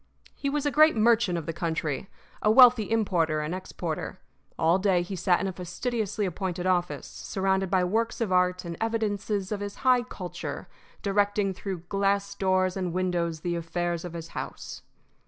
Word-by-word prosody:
He 280 - -3
was 295 +1 -1
a 290 - +2
great 310 0 +6
merchant 225 -4 +3
of 165 - -4
the 165 - -3
country, 160 0 -2 0.3
a 215 - +3
wealthy 240 -2 +7
importer 170 -9 +1
and 150 +3 -3
exporter. 175 -3 -5 0.4
All 165 +3 +3
day 185 -3 +2
he 190 +2 -5
sat 180 0 +2
in - - -2
a 190 - -2
fastidiously 210 +4 -2
appointed 180 0 -3
office, 180 -1 0
surrounded 190 -1 -1
by 185 -1 +3
works 225 +7 0
of 225 -5 -1
art 180 0 +2
and 170 0 -5
evidences 210 -3 -1
of 210 - -1
his 205 0 -5
high 255 -1 +5
culture, 175 - -6 0.4
directing 200 -1 +1
through 185 -2 -5
glass 200 +2 0
doors 185 -1 +1
and 180 -3 -2
windows 175 -3 -1
the 175 0 -1
affairs 170 0 -2
of 175 -2 -7
his 165 -1 -7
house. - - -7
185 Hz, 175 wpm, -27 LUFS, 175-210 Hz, 0.4 s, wealthy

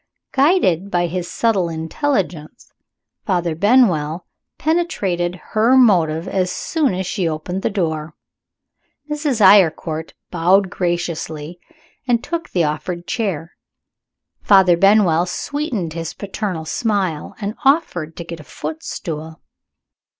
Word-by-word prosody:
Guided 265 - +2
by 175 -2 +1
his 175 +1 -4
subtle 200 -7 +1
intelligence, 170 - -3 0.5
Father 175 -4 0
Benwell 175 - +2 0.3
penetrated 195 - 0 0.2
her 230 +5 +4
motive 170 -8 +3
as 185 -2 0
soon 295 - 0
as 190 +1 -3
she 180 -2 -1
opened 170 +4 -4
the - - 0
door. 160 -6 -2 1.0
Mrs. 295 -6 -1
Eyrecourt 170 -5 +4 0.2
bowed 185 +2 +3
graciously, 170 -2 -3 0.5
and 235 -2 +2
took 335 -1 -4
the 175 - +1
offered 170 +3 -3
chair. 175 -8 -3 0.9
Father 190 -3 +5
Benwell 185 -3 +4
sweetened 230 - -3
his 165 0 -5
paternal 195 -5 -4
smile 190 -4 -2
and 205 -1 -3
offered 265 - +1
to 170 - -5
get 170 -1 -7
a - - -10
footstool. 160 +1 -6
180 Hz, 115 wpm, -19 LUFS, 165-215 Hz, 1.0 s, Father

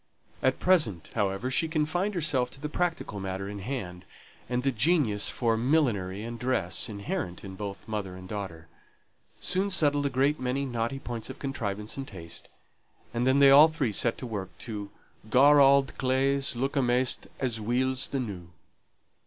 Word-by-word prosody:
At 130 0 +1
present, 150 - +2
however, 100 +3 -1
she 160 +5 +2
confined 165 +6 -1
herself 150 -7 +1
to - - -12
the 150 - -3
practical 165 - -2
matter 95 0 -4
in 100 0 -6
hand; 95 -6 -5 0.5
and 125 0 -1
the 135 - +2
genius 120 -4 +2
for 115 -2 +1
millinery 110 -7 +1
and 115 0 -6
dress, 105 -10 -1
inherent 105 - -4
in 95 -1 -7
both 100 +1 -7
mother 105 -4 -4
and 95 0 -10
daughter, 95 -6 -6 0.7
soon 190 +2 0
settled 145 -6 +2
a - - -1
great 135 +3 +1
many 130 +2 -1
knotty 120 0 -2
points 120 -3 -6
of 130 - -7
contrivance 105 -6 -4
and 135 -1 -5
taste, 85 -4 -9 0.7
and 120 +2 0
then 130 +1 +4
they 140 -1 +7
all 145 +3 +9
three 155 -7 -1
set 115 +3 +1
to - - -7
work 105 -5 -4
to 105 -4 -6 0.4
"gar 145 +5 +6
auld 135 -3 +5
claes 135 0 +1
look 135 +5 -2
amaist 125 -1 +1
as 120 -4 -1
weel's 130 +4 +1
the 135 - -2
new." 100 -8 -5
125 Hz, 170 wpm, -28 LUFS, 105-140 Hz, 0.7 s, all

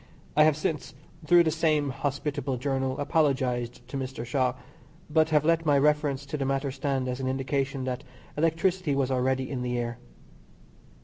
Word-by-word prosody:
I 150 - +7
have 155 -2 +3
since, 150 -3 -3 0.3
through 175 -1 +7
the 160 - +1
same 155 -3 +1
hospitable 140 -1 -2
journal, 135 0 -1
apologised 130 -5 0
to 135 - -5
Mr. 130 -3 -4
Shaw, 125 0 0 0.6
but 160 +1 +4
have 150 -1 +3
let 165 0 +3
my 145 -3 +4
reference 145 -1 +2
to 145 +2 -4
the 140 - -1
matter 135 0 0
stand 135 -1 -1
as 125 0 -3
an 130 - -2
indication 135 +1 -1
that 130 -1 -3 0.3
electricity 165 0 +1
was 135 -1 0
already 130 0 +1
in 130 -3 -3
the 125 0 -1
air. 120 -1 -3
140 Hz, 170 wpm, -27 LUFS, 130-150 Hz, 0.6 s, I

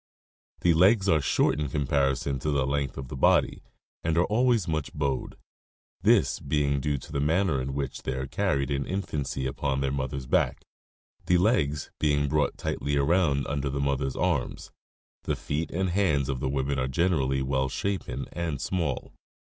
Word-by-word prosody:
The 85 - +4
legs 95 +5 +4
are 80 -5 +4
short 70 - +2
in 75 -2 -1
comparison 70 0 0
to 75 - -2
the 70 -3 +1
length 70 0 -1
of 65 -1 -5
the - - -6
body 65 - +3 0.4
and 80 0 0
are 90 - +4
always 115 -3 +2
much 80 -3 -2
bowed, 70 -3 -2 0.6
this - - +3
being 70 0 0
due 75 0 -1
to 65 - -11
the 70 - -1
manner 80 -1 +2
in 65 +1 -4
which 70 -2 -3
they 65 - -3
are 65 0 -3
carried 70 +1 0
in 70 0 -1
infancy 75 -8 -3
upon 65 +1 -1
their 70 -1 0
mother's 65 -1 -3
back, - - +1 0.6
the 90 - +4
legs 75 - +1
being 70 -1 +2
brought 75 +1 0
tightly 70 0 -2
around 70 -1 +2
under 70 -1 -2
the 70 +1 -3
mother's 70 -1 0
arms. 85 -9 -1 0.5
The - - 0
feet 75 +3 -3
and 95 +1 -1
hands 80 -9 +1
of 65 -2 -2
the 65 - -1
women 70 0 -1
are 65 - 0
generally 65 -3 +1
well 65 0 0
shapen 100 +7 -3
and 80 -4 -3
small. 80 -8 -2
70 Hz, 175 wpm, -27 LUFS, 70-85 Hz, 0.6 s, The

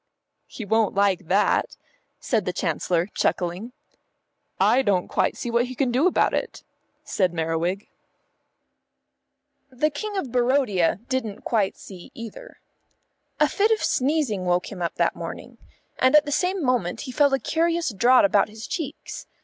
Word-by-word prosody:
"He 220 - -8
won't 220 0 +1
like 195 -3 +1
that," 200 +4 +1 0.4
said 220 -6 -1
the 180 - -2
Chancellor, 175 -1 0
chuckling. 180 +7 -1 0.9
"I 260 - +4
don't 195 -7 +1
quite - - 0
see 240 - -4
what 235 +1 +2
he 255 - -8
can 255 -1 0
do 265 +8 +3
about 370 - +2
it," - - -3 0.4
said 185 -3 0
Merriwig. 165 +4 -2 1.8
The 275 +4 0
King 410 +8 -5
of 275 -10 -3
Barodia 240 -8 +2
didn't 255 -6 -3
quite 210 -5 0
see 185 -3 -12
either. 230 - -10 0.8
A - - +5
fit 420 +2 +1
of 445 -1 +1
sneezing 265 -8 0
woke 180 0 0
him 190 -3 -8
up 170 - -2
that - - +1
morning, - - -8 0.4
and 260 +3 +4
at 300 - +6
the 290 - -4
same 365 +3 0
moment 245 -9 0
he 260 - -6
felt 285 +1 +3
a - - +4
curious 330 -1 0
draught 240 +4 +5
about 200 +1 +3
his 220 +1 -9
cheeks. 320 -6 -6
235 Hz, 155 wpm, -24 LUFS, 190-280 Hz, 1.8 s, at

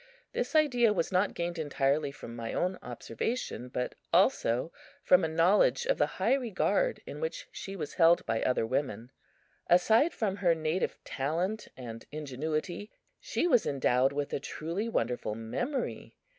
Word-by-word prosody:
This - - -2
idea 245 -8 +4
was 170 -2 -1
not 185 +2 +1
gained 170 0 -3
entirely 145 -1 +1
from 120 -4 -9
my 115 -1 -5
own 185 +1 0
observation, 125 - -4
but 125 0 -3 0.2
also 125 +8 +3 0.3
from 180 0 +5
a - - +2
knowledge 175 - +3
of - - +1
the - - +4
high - - +3
regard 270 - 0
in - - -7
which 485 +1 -4
she 195 - -7
was 155 -6 -5
held 170 0 +5
by 115 -1 0
other 125 -3 +1
women. 125 -1 -2 0.6
Aside 220 - +5
from 200 -3 -2
her 175 -4 +3
native 160 +3 -1
talent 175 +10 -2
and 115 -3 -8
ingenuity, 155 +7 -3 0.3
she - - -1
was 250 -10 +4
endowed 135 -1 +2
with 145 0 -3
a - - 0
truly 170 +10 -4
wonderful 120 - -1
memory. 240 - -4
165 Hz, 155 wpm, -30 LUFS, 130-210 Hz, 0.6 s, from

